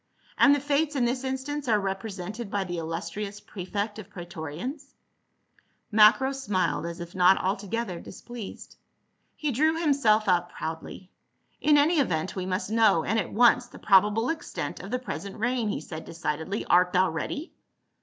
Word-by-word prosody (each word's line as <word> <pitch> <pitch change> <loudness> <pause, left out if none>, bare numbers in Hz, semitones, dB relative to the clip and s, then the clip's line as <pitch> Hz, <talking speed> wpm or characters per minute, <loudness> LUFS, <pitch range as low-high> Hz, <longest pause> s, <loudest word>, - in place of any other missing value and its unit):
"And 285 - +6
the - - -1
Fates 290 +2 0
in 250 -3 +2
this 250 +2 -1
instance 265 +2 -3
are 215 -3 +3
represented 195 +2 -4
by 200 -1 -1
the 175 -2 -4
illustrious 170 +5 -5
prefect 205 +2 -4
of 205 -2 -10
praetorians 175 - -7 0.5
?" - - -39
Macro 215 +5 +6
smiled 205 - -1
as 170 0 -6
if 170 0 -8
not 185 +1 +5
altogether 195 0 -2
displeased. 235 +2 -9 0.6
He 300 -2 -2
drew 315 +6 +2
himself 270 -10 +3
up 175 -1 +2
proudly. 165 +3 -6 0.3
" - - -43
In 300 0 +5
any 305 +3 +4
event 170 - 0
we 185 -1 -3
must 190 +2 -2
know, 220 -7 +4
and 225 +6 +1
at 185 - -3
once, 240 +2 +4
the - - -13
probable 210 +4 +4
extent 325 - -4
of 195 - -8
the 250 - 0
present 200 -5 -6
reign," 235 0 0
he - - -2
said 160 -1 -8
decidedly. 160 +4 -3
"Art 180 0 +4
thou 185 -1 +3
ready?" 285 - -4
210 Hz, 165 wpm, -27 LUFS, 180-255 Hz, 0.6 s, And